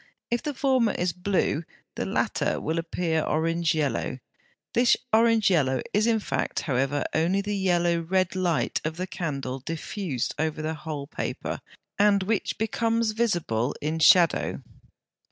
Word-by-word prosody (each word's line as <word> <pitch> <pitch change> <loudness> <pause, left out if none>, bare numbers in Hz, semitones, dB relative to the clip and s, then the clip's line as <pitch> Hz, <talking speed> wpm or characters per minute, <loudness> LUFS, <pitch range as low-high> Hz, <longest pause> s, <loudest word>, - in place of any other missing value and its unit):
If 240 - +1
the 295 -2 -4
former 260 -4 +2
is 175 -1 -1
blue 180 -3 0 0.3
the - - -3
latter - - 0
will 160 +2 -1
appear 165 -1 -1
orange 165 +2 0
yellow: 145 -4 -1 0.6
this 240 0 +4 0.2
orange 225 -2 +4
yellow 135 -7 +2
is 215 +2 +3
in 225 -1 +3
fact, - - -2
however, 135 +1 0
only 170 +5 +2
the 205 +1 -2
yellow 175 -3 +2
red 185 +2 0
light 180 -4 0
of 155 +1 -3
the 180 - -2
candle 140 -8 -4
diffused 160 - -3
over 155 0 -1
the 155 +1 -1
whole 155 -2 -5
paper, 140 - -4 0.4
and 200 -1 +4
which 210 +1 -1
becomes 225 0 0
visible 175 - 0
in 155 +2 -2
shadow. 170 +1 +4
170 Hz, 145 wpm, -26 LUFS, 155-205 Hz, 0.6 s, this